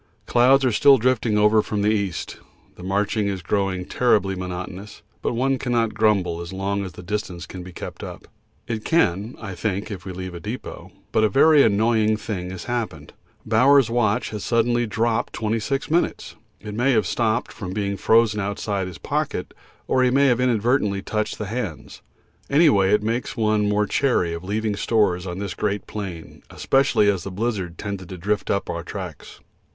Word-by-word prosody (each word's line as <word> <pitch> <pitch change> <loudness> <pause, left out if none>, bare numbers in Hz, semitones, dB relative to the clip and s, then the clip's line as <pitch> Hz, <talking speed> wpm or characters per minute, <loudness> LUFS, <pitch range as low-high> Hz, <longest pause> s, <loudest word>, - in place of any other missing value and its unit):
Clouds 130 +3 +4
are 125 - +3
still 135 +5 +6
drifting 115 -3 +1
over 105 +1 +5
from 105 -1 -2
the 105 - +3
east. 100 -5 -2 0.4
The - - -13
marching 100 +3 0
is 95 -3 -3
growing 95 -1 -1
terribly 105 -6 +2
monotonous, 95 +2 -7 0.2
but - - -1
one 135 +2 +1
cannot 120 -3 0
grumble 100 -6 +1
as 85 - -7
long 100 +1 -2
as 95 -3 -7
the 90 - -10
distance 95 -3 -4
can 95 - -8
be 90 +1 -9
kept - - -8
up. - - -9 0.4
It 110 -2 -4
can, 105 - +1
I 100 -4 -6
think, 100 +2 -3
if 95 -3 -6
we 95 - -6
leave 90 0 -6
a 85 - -7
depot, 105 +8 -7 0.2
but 110 - +2
a 110 - +4
very 150 +3 +6
annoying 110 -1 +3
thing 100 -4 -5
has 95 -2 -7
happened. 110 -12 -4 0.3
Bowers' 125 +3 +4
watch 110 -3 +1
has 105 -2 -5
suddenly 120 0 +1
dropped 110 +2 0
26 115 +6 -2
minutes; 170 +2 0 0.2
it 105 +1 -8
may 125 +5 +2
have 110 -4 +2
stopped 115 +5 0
from 95 -4 -7
being 100 0 -2
frozen 110 +1 +3
outside 100 -1 -2
his 90 -3 -8
pocket, - - -3 0.3
or 130 - +2
he 125 - +4
may 140 +3 +3
have 125 -3 +3
inadvertently 115 -4 +1
touched 110 0 -2
the 105 - -4
hands. 105 -6 -5 0.5
Any 155 +3 +5
way 95 -4 +3
it 105 0 +3
makes 115 +3 -2
one 105 -2 +2
more 105 0 +2
chary 105 -9 +1
of 85 +1 -6
leaving 105 +2 -1
stores 100 -4 +1
on 90 0 -5
this 100 -2 -4
great 100 +2 -2
plain, 95 -6 -7
especially 135 -6 +2
as 95 -4 +1
the - - -5
blizzard 95 -4 -3
tended 100 -3 -6
to 95 - -7
drift 100 +4 -2
up 100 - 0
our 85 - -3
tracks. 90 -2 -8
105 Hz, 185 wpm, -23 LUFS, 95-115 Hz, 0.5 s, still